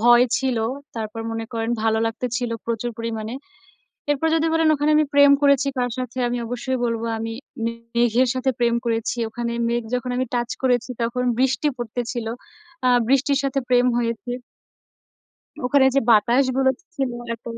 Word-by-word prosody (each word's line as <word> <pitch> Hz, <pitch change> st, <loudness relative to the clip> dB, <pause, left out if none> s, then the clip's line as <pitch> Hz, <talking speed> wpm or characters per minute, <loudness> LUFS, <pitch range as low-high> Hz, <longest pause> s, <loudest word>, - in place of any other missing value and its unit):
ভয় 240 Hz, +1 st, +6 dB
ছিল, 260 Hz, -3 st, 0 dB, 0.4 s
তারপর 220 Hz, 0 st, -4 dB
মনে 225 Hz, 0 st, -3 dB
করেন 225 Hz, 0 st, -2 dB
ভালো 220 Hz, 0 st, +2 dB
লাগতে 225 Hz, +2 st, -3 dB
ছিল 245 Hz, -2 st, -2 dB, 0.2 s
প্রচুর 235 Hz, +1 st, -2 dB
পরিমাণে। 225 Hz, 0 st, -4 dB, 0.8 s
এরপর 290 Hz, +2 st, +1 dB
যদি 325 Hz, 0 st, +2 dB
বলেন 325 Hz, -1 st, +3 dB
ওখানে 295 Hz, +1 st, +1 dB
আমি 305 Hz, -, +4 dB
প্রেম 285 Hz, 0 st, +7 dB
করেছি 280 Hz, -1 st, +4 dB
কার 245 Hz, 0 st, 0 dB
সাথে? 255 Hz, 0 st, -4 dB
আমি 245 Hz, -, -2 dB
অবশ্যই 245 Hz, +2 st, -2 dB
বলব 230 Hz, -1 st, -1 dB, 0.2 s
আমি 225 Hz, 0 st, -4 dB, 0.3 s
মে 230 Hz, -, 0 dB, 0.2 s
মেঘের 240 Hz, +2 st, +3 dB
সাথে 260 Hz, +1 st, +1 dB
প্রেম 235 Hz, -1 st, +2 dB
করেছি। 230 Hz, 0 st, -1 dB
ওখানে 235 Hz, +1 st, -4 dB, 0.2 s
মেঘ 240 Hz, 0 st, 0 dB
যখন 250 Hz, 0 st, -2 dB
আমি 255 Hz, +1 st, 0 dB
touch 240 Hz, 0 st, -1 dB
করেছি 250 Hz, -1 st, +1 dB
তখন 235 Hz, +2 st, -1 dB, 0.2 s
বৃষ্টি 265 Hz, +2 st, +2 dB
পড়তে 240 Hz, 0 st, -4 dB
ছিল। 240 Hz, -3 st, -4 dB, 0.6 s
আ -, -, +5 dB, 0.2 s
বৃষ্টির 275 Hz, +1 st, +3 dB
সাথে 275 Hz, 0 st, 0 dB
প্রেম 250 Hz, 0 st, +4 dB
হয়েছে। 230 Hz, 0 st, -2 dB, 1.3 s
ওখানে 265 Hz, +1 st, +4 dB
যে, 275 Hz, -, +4 dB
বাতাসগুলো 260 Hz, +4 st, +4 dB
ছি -, -, -29 dB
ছিল 270 Hz, -2 st, 0 dB, 0.2 s
এত 230 Hz, -, -17 dB
245 Hz, 165 wpm, -22 LUFS, 230-265 Hz, 1.3 s, প্রেম